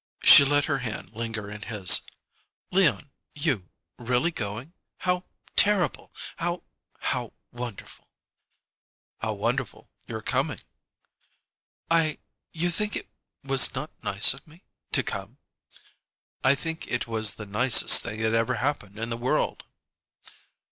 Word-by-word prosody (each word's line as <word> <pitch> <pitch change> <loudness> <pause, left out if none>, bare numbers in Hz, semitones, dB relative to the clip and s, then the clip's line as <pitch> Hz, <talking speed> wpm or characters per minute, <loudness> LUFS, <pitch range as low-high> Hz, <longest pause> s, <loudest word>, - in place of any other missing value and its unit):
She - - +10
let 145 +1 +2
her 140 -3 -1
hand 110 -5 -6
linger 115 -2 -4
in 105 0 -8
his. 105 -4 +3 0.7
"Leon 180 -6 +2 0.2
you 145 - -1 0.3
really 125 +7 +1
going? 115 - -6 0.2
How 180 0 -1 0.3
terrible! 200 -3 +2 0.3
How 175 +1 -2 0.4
how - - -2 0.2
wonderful!" 120 -3 -8 1.1
"How 110 -1 -2
wonderful' 115 +4 -3 0.2
your - - -6
coming!" - - -1 1.3
"I 160 -2 +2 0.3
You 175 +2 0
think 210 +4 -1
it - - -6 0.3
was 135 -1 +4
not 140 +4 -4
nice 100 +4 +4
of 135 +3 -14
me 160 +4 -18 0.3
to - - +2
come?" 100 +6 -6 1.1
"I 130 +1 +5
think 160 +3 -5
it 125 - -2
was 110 -2 +2
the 105 - -8
nicest 115 +5 +6
thing 110 +1 -6
that 110 0 +1
ever 115 +2 +1
happened 110 -5 -3
in 115 +1 -4
the 115 - -2
world." 120 +2 -1
125 Hz, 125 wpm, -26 LUFS, 110-155 Hz, 1.3 s, She